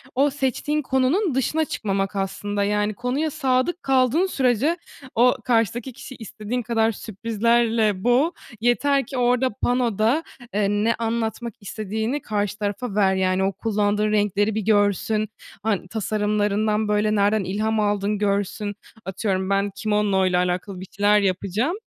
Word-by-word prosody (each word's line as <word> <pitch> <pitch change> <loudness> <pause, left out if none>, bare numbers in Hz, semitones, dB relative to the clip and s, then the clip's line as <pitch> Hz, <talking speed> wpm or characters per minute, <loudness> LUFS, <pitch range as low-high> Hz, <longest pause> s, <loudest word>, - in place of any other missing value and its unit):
O 280 +3 +4
seçtiğin 285 +2 -1
konunun 270 - +1
dışına 310 +4 +1
çıkmamak 195 -6 -2
aslında, 200 +1 -2
yani, 210 +1 0
konuya 260 +7 -1
sadık 265 +7 0
kaldığın 265 +6 +3
sürece 270 - +1 0.4
o 245 +2 +5
karşıdaki 235 +1 0
kişiyi 260 - -10
istediğin 225 +2 -4
kadar 225 -1 +1
sürprizlerle 225 -1 0
boğ. 255 +7 +3 0.3
Yeter 275 +3 +2
ki 270 +2 -6
orada, 250 +1 +2
panoda, 245 +3 +1 0.3
eee, 205 -1 +1
ne 210 +3 +1
anlatmak 230 0 -2
istediğini 220 +6 -3
karşı 205 -3 -2
tarafa 205 +1 -3
ver. 195 -2 +3
Yani, 185 0 +1
o 195 +1 0
kullandığın 210 -1 0
renkleri 205 0 +1
bir 220 - 0
görsün, 210 +1 +1 0.3
han 210 -4 -1
tasarımlarından, 210 +1 0
böyle, 210 +1 +1
nereden 205 +1 +2
ilham 215 +4 -1
aldın 205 0 0
görsün. 205 0 -1 0.3
Atıyorum, 190 0 -2
ben 200 0 +1
kimono 210 -3 +1
ile 180 -1 +2
alakalı 180 +2 -1
bir 190 - -8
şeyler 205 +1 +4
yapacağım. 200 - 0
215 Hz, 135 wpm, -23 LUFS, 205-245 Hz, 0.4 s, o